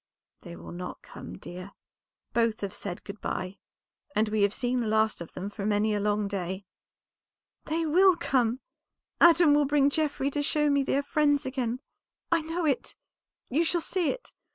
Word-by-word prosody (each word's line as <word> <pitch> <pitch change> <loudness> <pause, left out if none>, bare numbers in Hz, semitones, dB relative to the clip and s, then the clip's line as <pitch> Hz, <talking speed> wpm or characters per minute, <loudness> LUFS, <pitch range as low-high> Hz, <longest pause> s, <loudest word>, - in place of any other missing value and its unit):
"They 170 -2 -10
will - - -10
not 180 +1 -7
come, - - -10
dear; 185 +2 -9 0.6
both 230 -2 +1
have 200 -2 -3
said 180 -3 -6
good 200 +1 -9
by, 185 +2 -4 0.6
and 215 0 +2
we 215 0 0
have 200 0 +4
seen 245 +3 -1
the 235 - -1
last 220 -2 +2
of 170 - -8
them 195 +3 -5
for 205 - -6
many 210 +1 +2
a 205 - 0
long 205 0 0
day." 190 0 -4 1.0
"They 325 +2 -1
will 365 +4 +5
come! 255 -5 +1 0.6
Adam 335 -3 +7
will 295 0 +4
bring 285 0 +3
Geoffrey 285 -2 0
to 290 - -1
show 300 0 +2
me 280 0 +3
they 275 - 0
are 285 - 0
friends 290 0 +2
again. 255 -1 -2 0.5
I 335 -1 +4
know 325 +2 -2
it; 280 -4 -1 0.5
you 300 +7 +2
shall 345 +1 +1
see 345 0 -1
it. - - -5
255 Hz, 180 wpm, -28 LUFS, 205-300 Hz, 1.0 s, Adam